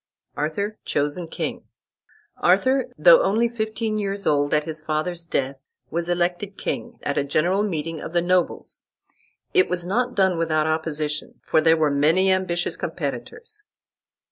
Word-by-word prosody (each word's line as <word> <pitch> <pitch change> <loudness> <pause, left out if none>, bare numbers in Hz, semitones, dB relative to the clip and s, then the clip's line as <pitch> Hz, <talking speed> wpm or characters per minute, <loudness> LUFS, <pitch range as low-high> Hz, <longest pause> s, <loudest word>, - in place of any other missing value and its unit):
ARTHUR 200 +9 -2
CHOSEN 145 +4 -1
KING - - -4 0.7
Arthur, 260 +9 +3
though - - +7
only 225 +4 +2
fifteen 220 -1 -2
years 200 0 -3
old 145 -1 +2
at 150 0 +2
his 155 0 -4
father's 160 +3 -2
death, 135 -4 -2 0.3
was 170 +1 -1
elected 175 +3 -1
king, 240 -1 -4
at 145 - 0
a - - +1
general 170 +7 +1
meeting 165 -5 -3
of - - -6
the 175 0 +2
nobles. 180 0 0 0.7
It 375 -1 +4
was 175 -1 -1
not 245 +7 0
done 190 -3 +2
without 155 -2 +1
opposition, 155 -1 -2
for 155 - +2
there 165 +1 +4
were 155 -2 +2
many 160 +7 +3
ambitious 180 -2 0
competitors. 440 -2 -5
175 Hz, 145 wpm, -23 LUFS, 155-205 Hz, 0.7 s, though